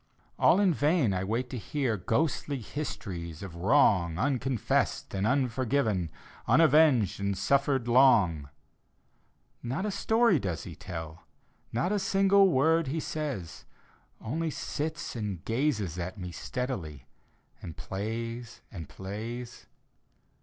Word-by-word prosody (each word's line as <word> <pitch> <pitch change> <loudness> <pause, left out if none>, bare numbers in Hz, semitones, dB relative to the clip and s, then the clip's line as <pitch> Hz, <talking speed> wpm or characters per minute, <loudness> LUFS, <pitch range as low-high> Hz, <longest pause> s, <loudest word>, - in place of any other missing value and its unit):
All 185 - +5
in 195 -4 +4
vain 145 - +2
I 95 0 -1
wait 115 +6 -1
to 125 - -4
hear 135 -2 -1
Ghostly 135 - -1
histories 95 - -6
of 95 -4 -7
wrong 90 - +3
Unconfessed 130 0 0
and 100 +2 0
unforgiiven. 125 - 0 0.4
Unavenged 140 - +4
and 100 -1 -1
suffered 135 +3 +1
long; 100 - +4 1.1
Not 130 - -3
a 210 - -1
story 220 -2 +3
does 90 -7 -3
he - - -8
tell, 80 -3 -8 0.4
Not 125 - 0
a 210 - +1
single 195 0 +4
word 160 +1 +3
he 155 +5 -2
says 145 - -5 0.3
— - - -36
Only 160 +8 -2
sits 155 +1 -4
and 105 -7 -4
gazes 110 - -1
at 90 +4 -5
me 90 -2 -6
Steadily, 85 - -5 0.6
and 80 - -8
plays 115 +4 -5
and 85 -8 -8
plays. 115 +5 -7
120 Hz, 125 wpm, -29 LUFS, 95-145 Hz, 1.1 s, All